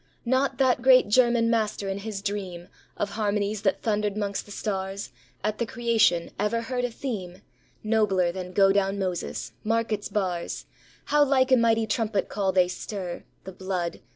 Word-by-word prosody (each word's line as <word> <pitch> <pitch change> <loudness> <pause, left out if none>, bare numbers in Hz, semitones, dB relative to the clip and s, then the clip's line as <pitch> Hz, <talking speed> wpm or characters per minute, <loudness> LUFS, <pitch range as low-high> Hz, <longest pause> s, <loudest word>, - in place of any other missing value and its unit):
Not 260 +3 +1
that 255 -2 +3
great 255 -3 +6
German 235 0 +4
master 215 -3 0
in 195 +1 -2
his 200 -1 -5
dream 190 -4 -4 0.3
Of 205 - -2
harmonies 210 -1 -1
that 195 -2 0
thundered 210 -2 0
amongst 200 -1 -3
the - - -12
stars 195 - -3 0.3
At 215 0 -1
the 235 - +1
creation, 225 -8 +2
ever 210 +3 +1
heard 245 +1 -1
a - - -1
theme 205 -7 -6 0.4
Nobler 210 -5 +2
than 180 0 -6
"Go 195 +1 +5
Down, 195 0 +1
Moses." 185 -3 -3
Mark 230 +1 0
its 210 -1 -2
bars, 180 -4 -2 0.4
How 295 0 +4
like 265 -2 +3
a - - +8
mighty 225 -2 +3
trumpet 215 -2 -1
call 195 -2 0
they 185 -1 +4
stir 180 -1 -6 0.2
The 190 - -8
blood. 185 -2 -3
205 Hz, 170 wpm, -26 LUFS, 190-230 Hz, 0.4 s, a